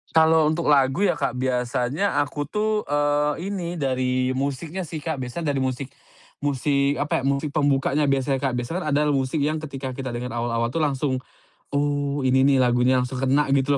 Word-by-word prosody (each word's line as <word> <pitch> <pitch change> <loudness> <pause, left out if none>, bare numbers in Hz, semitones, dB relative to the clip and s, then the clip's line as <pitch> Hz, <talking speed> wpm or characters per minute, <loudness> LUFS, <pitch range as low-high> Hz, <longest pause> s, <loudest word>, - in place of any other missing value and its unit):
Kalau 160 -1 +5
untuk 160 -1 +1
lagu 140 +6 +3
ya, 180 - +1
Kak, 135 -3 -1
biasanya 125 +6 0
aku 145 0 -5
tuh, 215 +2 -1
eee, 145 +5 0
ini, 175 -3 -3
dari 130 -3 0
musiknya 140 +7 -3
sih, 155 -4 -6
Kak. 160 -5 -3
Biasanya 145 +5 -3
dari 135 - -1
musik 130 0 -2 0.5
musik 140 0 0
apa 145 - 0
ya, - - -6
musik 140 +2 0
pembukanya 145 0 +1
biasanya, 135 0 +1
Kak. 135 -3 -1
Biasanya 155 +8 -3
adalah 150 0 +2
musik 135 +2 0
yang 155 +2 0
ketika 140 -3 -6
kita 130 -1 -5
dengar 125 +1 -4
awal-awal 115 0 -1
tuh - - -3
langsung, 135 -1 0 0.5
"Oh, 145 -1 -1
ini 130 +1 +4
nih 135 0 +4
lagunya," 125 0 +3
langsung 125 +1 -2
kena 135 +3 +3
gitu 140 +1 +2
140 Hz, 180 wpm, -23 LUFS, 130-150 Hz, 0.5 s, Kalau